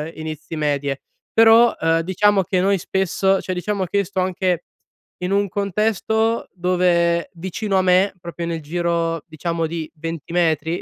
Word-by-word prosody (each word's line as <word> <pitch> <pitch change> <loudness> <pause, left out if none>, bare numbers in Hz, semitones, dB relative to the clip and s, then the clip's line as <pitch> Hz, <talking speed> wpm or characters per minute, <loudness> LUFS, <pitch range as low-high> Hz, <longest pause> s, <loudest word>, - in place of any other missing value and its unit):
inizi 155 0 -6
medie. 145 -2 -1 0.3
Però, 225 +1 +6
uhm, 165 0 +2
diciamo 195 +3 +2
che 180 +2 0
noi 195 +1 +2
spesso 190 +1 +1
cioè, 185 - -3
diciamo 190 +1 -2
che 200 - -2
io 200 - +3
sto 190 +1 -4
anche 185 -1 0 0.6
in 180 - -1
un 200 0 +2
contesto 220 +3 0
dove 175 -2 +1
vicino 190 +3 -2
a 190 - +4
me, 185 +2 +3
proprio 170 -1 -6
nel 165 -1 -3
giro 170 0 -1
diciamo, 165 +1 -2
di 160 -1 -5
20 165 0 -6
metri 165 0 +1
175 Hz, 155 wpm, -21 LUFS, 165-195 Hz, 0.6 s, Però